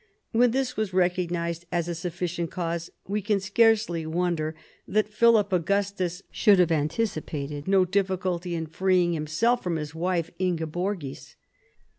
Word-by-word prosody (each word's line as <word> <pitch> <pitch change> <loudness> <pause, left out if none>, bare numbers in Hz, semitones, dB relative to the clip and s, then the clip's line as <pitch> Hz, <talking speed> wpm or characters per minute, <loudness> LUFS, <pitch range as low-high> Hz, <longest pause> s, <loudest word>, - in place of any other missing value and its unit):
When 245 +1 +4
this 255 +1 -1
was 215 -4 -2
recognised 175 -2 0
as 175 -1 0
a 175 - -2
sufficient 175 0 -3
cause, 170 -1 -3 0.2
we 205 +2 -1
can 205 0 +1
scarcely 210 -4 +2
wonder 165 -2 -1 0.3
that 210 0 0
Philip 215 -3 +4
Augustus 185 0 0
should 205 -3 +5
have 180 -2 +4
antici 160 +3 0
pated 145 0 -5
no 190 -1 +4
difficulty 185 -2 -1
in 165 -1 -2
freeing 180 +1 +2
himself 165 +11 +1
from 175 -2 -2
his 150 -1 -4
wife 170 0 -1
Inge 175 -3 0
borgis. 175 -5 -4
180 Hz, 145 wpm, -26 LUFS, 165-200 Hz, 0.3 s, should